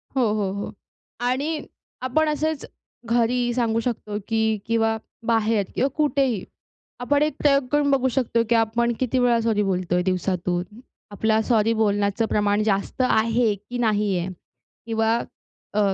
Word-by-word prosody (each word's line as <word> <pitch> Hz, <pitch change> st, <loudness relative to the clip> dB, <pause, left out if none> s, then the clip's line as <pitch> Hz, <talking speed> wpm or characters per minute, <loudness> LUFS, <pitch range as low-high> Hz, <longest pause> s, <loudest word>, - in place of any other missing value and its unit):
हो, 265 Hz, -, +2 dB
हो, 205 Hz, -3 st, -1 dB
हो. 200 Hz, 0 st, -5 dB, 0.5 s
आणि 280 Hz, +6 st, -1 dB, 0.4 s
आपण 305 Hz, +5 st, +1 dB
असेच 305 Hz, 0 st, -1 dB, 0.4 s
घरी 240 Hz, +1 st, +2 dB
सांगू 230 Hz, -2 st, +1 dB
शकतो, 220 Hz, -3 st, -3 dB
की 220 Hz, -1 st, +1 dB
किंवा 225 Hz, -1 st, +1 dB, 0.3 s
बाहेर 225 Hz, -3 st, +2 dB
किंवा 265 Hz, -, +2 dB
कुठेही, 275 Hz, -, +1 dB, 0.6 s
आपण 285 Hz, +4 st, +2 dB
एक 300 Hz, -1 st, 0 dB
प्रयोग 275 Hz, -2 st, +3 dB
करून 290 Hz, -1 st, +3 dB
बघू 265 Hz, -1 st, +3 dB
शकतो, 235 Hz, -3 st, +2 dB
की 235 Hz, -, +3 dB
आपण 230 Hz, +1 st, +2 dB
किती 255 Hz, 0 st, +1 dB
वेळा 240 Hz, -2 st, +3 dB
सॉरी 225 Hz, -2 st, +1 dB
बोलतोय 180 Hz, -2 st, 0 dB
दिवसातून. 180 Hz, -1 st, -1 dB, 0.5 s
आपला 220 Hz, +2 st, +1 dB
सॉरी 225 Hz, -1 st, +2 dB
बोलण्याचं 205 Hz, 0 st, +1 dB
प्रमाण 205 Hz, 0 st, +2 dB
जास्त 205 Hz, +4 st, 0 dB
आहे, 225 Hz, 0 st, +2 dB
की 210 Hz, +5 st, -8 dB
नाही 210 Hz, -4 st, +1 dB
आहे. 175 Hz, +1 st, -3 dB, 0.6 s
किंवा 225 Hz, 0 st, +1 dB, 0.6 s
अ, 210 Hz, -, +2 dB
225 Hz, 145 wpm, -23 LUFS, 210-250 Hz, 0.6 s, प्रयोग